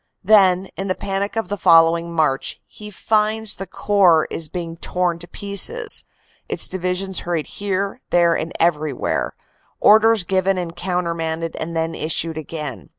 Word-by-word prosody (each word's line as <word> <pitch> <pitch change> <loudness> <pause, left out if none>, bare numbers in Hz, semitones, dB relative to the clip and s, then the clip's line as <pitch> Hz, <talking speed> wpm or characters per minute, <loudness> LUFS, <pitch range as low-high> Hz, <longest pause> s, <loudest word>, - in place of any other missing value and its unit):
Then, 190 -2 +5
in 195 - -3
the 185 - -1
panic 200 +1 -3
of 225 -4 -2
the 205 +1 -4
following 165 +1 +4
March, 155 -5 0
he 210 0 -11
finds 215 +2 0
the 195 - -6
Corps 185 -6 +3
is 160 -2 -3
being 165 -1 -6
torn 175 0 -1
to 175 - -7
pieces, 425 - 0 0.4
its - - +2
Divisions 185 0 -2
hurried 170 -3 -2
here, 200 +3 -3
there 170 -1 +3
and 165 - -3
everywhere; 150 - 0 0.4
orders 220 -1 +5
given 190 +2 0
and 170 -2 -4
countermanded 165 -3 -3
and 165 +1 -4
then 165 0 -1
issued 160 +1 -1
again. 150 -3 -7
180 Hz, 150 wpm, -20 LUFS, 165-200 Hz, 0.4 s, Then